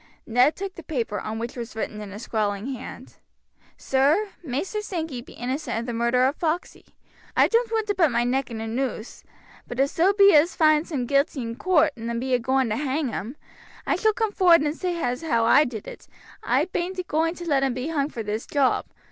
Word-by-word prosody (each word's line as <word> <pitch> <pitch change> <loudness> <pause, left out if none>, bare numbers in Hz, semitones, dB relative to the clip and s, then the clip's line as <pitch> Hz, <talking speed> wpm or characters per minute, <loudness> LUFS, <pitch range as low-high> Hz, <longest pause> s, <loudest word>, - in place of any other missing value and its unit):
Ned 245 +6 +3
took 390 -1 -5
the 340 - -10
paper, 235 - -3
on 215 +3 -5
which 235 +1 -5
was 235 -2 -7
written 215 -1 -4
in 205 -1 -8
a 200 - -7
scrawling 215 +2 -2
hand: 255 - -10 0.6
"Sir, 290 +11 +2
Maister 335 - -3
Sankey 320 -11 -4
be - - -14
innocent 255 +2 -3
of 230 - -3
the 240 - -4
murder 235 +2 +2
of 275 +3 0
Foxey. 335 +1 -3 0.4
I - - +6
doan't 460 0 +1
want 445 -1 0
to 410 - 0
put 350 -5 +3
my 240 -1 +1
neck 255 +2 0
in 225 -2 -6
a 225 - -4
noose, 240 -1 -4 0.4
but 245 - -6
if 275 +1 +2
so 355 +4 +3
be 400 -1 +6
as 310 +4 +4
they - - -27
finds 310 0 +3
him 260 -5 -1
guilty 275 0 +1
in 230 0 -5
coort 345 0 +3
and 235 0 -4
be 260 +1 -2
a 250 - +4
going 260 +1 +1
to 215 - -1
hang 280 0 -1
him, 235 +5 -5 0.5
I - - +1
shall 435 -1 +2
come 440 -1 -1
forward 350 -5 +5
and 300 +1 -1
say 360 -1 -2
as 250 -3 -1
how 230 -9 +1
I 285 +6 +6
did 225 -6 -6
it. - - -10 0.3
I - - +1
bean't 370 0 -3
agoing 330 -2 0
to 350 - -8
let 280 -4 +2
him 265 -3 0
be 255 +5 -3
hung 290 -3 0
for 230 -6 -5
this 210 +2 -4
job. 275 -3 +1
270 Hz, 225 wpm, -24 LUFS, 235-330 Hz, 0.6 s, I